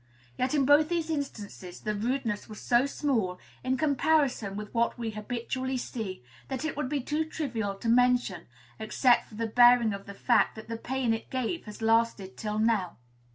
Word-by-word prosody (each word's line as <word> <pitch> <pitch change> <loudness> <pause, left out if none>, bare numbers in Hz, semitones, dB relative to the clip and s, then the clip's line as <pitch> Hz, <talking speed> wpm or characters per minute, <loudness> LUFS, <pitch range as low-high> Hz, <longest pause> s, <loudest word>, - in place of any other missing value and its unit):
Yet 255 +3 0
in 280 -2 +3
both 295 +3 +5
these 335 -2 -1
instances 205 - -5
the 210 - -2
rudeness 230 0 -2
was 215 - -8
so 245 +3 +3
small, 230 -11 -1 0.3
in 260 +1 0
comparison 280 -7 +1
with 210 0 -7
what 235 +1 +1
we 230 -2 -3
habitually 245 +4 -3
see, 215 - -5 0.2
that 265 +2 -3
it 315 - -2
would 285 -3 -2
be 290 -1 -1
too 300 +5 -1
trivial 240 -11 -3
to 195 - -6
mention, 245 -7 +2 0.3
except 240 +3 +3
for 215 - -12
the 230 +1 -2
bearing 240 -1 +5
of 200 0 -8
the 200 - -8
fact 240 +4 +2
that 220 0 -10
the 230 - -3
pain 250 0 -1
it 225 - -5
gave 260 +6 -2
has 210 +1 -9
lasted 225 -4 +1
till 210 -1 -3
now. 215 -5 +1
235 Hz, 185 wpm, -29 LUFS, 215-265 Hz, 0.3 s, both